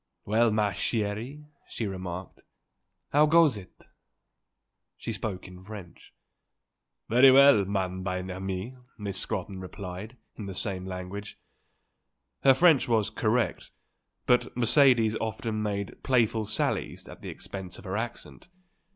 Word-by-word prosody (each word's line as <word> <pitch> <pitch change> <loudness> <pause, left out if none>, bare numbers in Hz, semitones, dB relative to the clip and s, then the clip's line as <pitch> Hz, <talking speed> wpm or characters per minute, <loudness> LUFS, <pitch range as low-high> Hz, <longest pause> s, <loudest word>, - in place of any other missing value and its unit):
"Well, 115 +3 +3
ma 105 -1 +1
chèrie," 110 +8 -3 0.2
she 115 - -4
remarked, 95 -2 -6 0.7
"How 150 +2 +5
goes 160 -3 +5
it?" 95 -3 -13 1.1
She 115 - -5
spoke 100 -2 -5
in 90 0 -12
French. 100 -4 -11 1.0
"Very 125 +4 +7
well, 135 -6 +7
ma 95 -1 0
bien 95 0 -4
aimée," 95 +7 -5 0.2
Miss 100 -3 -3
Scrotton 95 0 -4
replied 95 +4 -8 0.2
in 105 - -7
the 95 - -6
same 95 -2 -3
language. 95 +3 -6 1.0
Her 135 - +6
French 160 -3 +5
was 110 -3 +1
correct, 115 +2 0 0.6
but 125 0 +2
Mercedes 120 -3 +4
often 110 0 -3
made 100 -2 -3
playful 115 -4 +2
sallies 105 +2 -2
at - - -12
the - - -7
expense 95 -2 -7
of - - -13
her 95 +1 -3
accent. 115 +8 -6
105 Hz, 125 wpm, -28 LUFS, 95-120 Hz, 1.1 s, Very